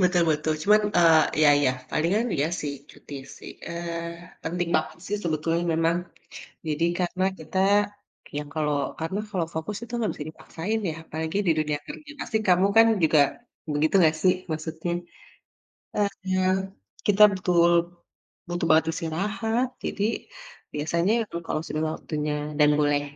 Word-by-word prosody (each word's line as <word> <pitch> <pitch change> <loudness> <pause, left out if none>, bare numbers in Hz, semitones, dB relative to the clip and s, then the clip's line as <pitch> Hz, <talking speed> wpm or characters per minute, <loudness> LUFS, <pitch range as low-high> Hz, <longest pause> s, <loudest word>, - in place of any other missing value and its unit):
Betul 180 -1 +4
betul. 155 +1 +1
Cuman, 210 +1 +5 0.2
eee, 165 -2 +7 0.2
iya 155 -1 +6
iya. 135 - +3 0.2
Palingan 195 +9 +1
iya, 145 +2 +2
sih, 145 -1 -3 0.2
cuti, 145 - -12 0.2
sih. - - -9 0.2
Eee, 170 0 -6
penting 175 +1 -2
banget, 155 0 0
sih, 205 - -1
sebetulnya 165 +1 0
memang. 165 +1 +2 0.7
Jadi 155 +2 0 0.2
karena 185 +1 0
kita 160 +4 -4 0.8
yang 150 0 -4
kalau 150 -2 0 0.2
karena 165 +5 -2
kalau 180 -5 -1
fokus 160 +6 -3
itu 235 - -13
nggak 225 -3 0
bisa 150 - -6
dipaksain, 185 +7 -4
ya, 155 - -5
apalagi 160 +3 -4
di 170 - +5
dunia 150 -1 0
kerja, 300 -1 -9
pasti 225 - -2
kamu, 180 +1 +5
kan, 225 - +8 0.2
juga, 155 -1 +5 0.5
begitu 150 +4 +1
nggak, 160 -2 +4
sih, 185 -1 +5 0.2
maksudnya. 160 +2 -4 1.4
Eee, 185 0 +1 0.6
kita 205 0 +6
betul 175 -2 +3 0.8
butuh 175 -1 -2
banget 160 0 +5
istirahat. 210 +10 -1 0.2
Jadi, 200 - -2 0.7
biasanya 170 +6 0 0.2
eng 170 0 -5
kalau 155 - -1
sudah 155 +1 -2
waktunya 150 -1 -3 0.3
dan 150 - +6
boleh, 145 -1 +2
170 Hz, 145 wpm, -26 LUFS, 155-185 Hz, 1.4 s, kan